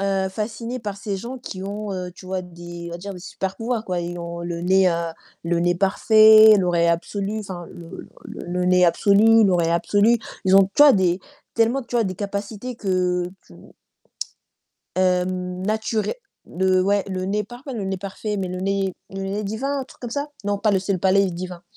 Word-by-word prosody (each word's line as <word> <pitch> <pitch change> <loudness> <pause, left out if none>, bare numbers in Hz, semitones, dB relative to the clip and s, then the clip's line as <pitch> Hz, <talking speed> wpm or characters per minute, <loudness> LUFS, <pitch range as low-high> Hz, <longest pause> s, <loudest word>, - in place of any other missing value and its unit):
heu, 195 -1 0
fascinée 230 +5 -4
par 205 -3 -5
ces 200 0 -4
gens 240 +6 -6
qui 190 -6 -8
ont, 205 +1 -4
heu, 180 -1 -4
tu 185 - -14
vois 185 0 -3
des, 175 -1 -9
on - - -8
va 170 - -6
dire 200 +2 -7
des - - -9
super 190 +1 -5
pouvoirs 230 -1 -2
quoi. 180 -3 -2
Ils 175 0 -5
ont 170 0 -6
le 170 0 -4
nez, 190 +1 +4
heu, - - +1 0.5
le 170 0 0
nez 175 +1 +2
parfait, 215 +3 +7
l'oreille 175 -2 +2
absolue, 200 +5 -1
enfin 185 -4 -7
le 170 -1 -10 0.2
le - - -8
le 180 +1 -1
nez 180 0 +5
absolu, 210 +6 +5
l'oreille 175 -4 +2
absolue. 205 +7 +3 0.3
Ils 190 0 +4
ont, 195 0 +8
tu - - +6
vois, 290 -2 +9
des, 180 -2 +2 0.4
tellement, 230 +4 +2
tu 240 - -4
vois, 230 - +3
des 185 -2 -3
capacités 205 +5 -5
que 180 -3 0 0.2
tu - - -17 1.4
heu, 180 -1 +3
nature 185 +4 -2 0.4
le 185 0 +1
ouais, 200 +1 +2
le 185 -1 -3
nez 210 +2 -1
par 240 +4 -12
le 235 -8 -4
nez 190 0 -2
parfait, 200 +2 -5
mais 190 -2 -2
le 185 - -5
nez, 195 0 0 0.2
le 195 0 -5
nez 195 +2 -3
divin, 265 +8 -2
un 265 - -5
truc - - -19
comme 240 - -6
ça? 285 +4 -3 0.2
Non, 205 0 0
pas 215 +1 +2
le 195 - +3
c'est 195 +2 -2
le 185 - -1
palais 190 +1 +3
divin 180 0 -7
195 Hz, 205 wpm, -22 LUFS, 180-215 Hz, 1.4 s, vois